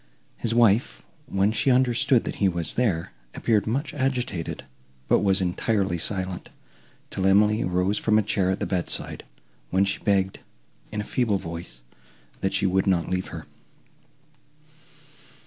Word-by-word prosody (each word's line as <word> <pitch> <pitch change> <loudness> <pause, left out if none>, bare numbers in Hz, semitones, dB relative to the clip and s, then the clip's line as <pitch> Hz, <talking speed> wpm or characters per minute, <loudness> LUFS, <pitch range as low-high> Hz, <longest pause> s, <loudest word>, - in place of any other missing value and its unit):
His 115 - -2
wife, 115 0 +3 0.2
when 100 -2 +1
she 110 +5 +1
understood 125 -1 +3
that - - -5
he 100 - +3
was 85 -4 -3
there, 100 -10 0 0.2
appeared 110 -3 +1
much 135 +8 -1
agitated, 125 - -2 0.4
but - - +4
was 95 -1 +2
entirely 95 0 0
silent, 95 -1 -2 0.6
till 95 0 0
Emily 105 +3 +4
rose 90 +3 0
from 110 -1 +2
a 110 - +3
chair 95 -2 +1
at 95 - 0
the - - -1
bedside, 90 -3 -2 0.5
when 95 +2 +3
she 100 - -1
begged, 95 -2 +1 0.5
in 105 -1 -2
a - - -5
feeble 110 -2 0
voice, 85 -8 -8 0.6
that 95 0 -1
she 100 - +1
would 95 +1 +1
not 90 -3 +1
leave 95 0 -1
her. - - -8
100 Hz, 145 wpm, -25 LUFS, 95-110 Hz, 0.6 s, but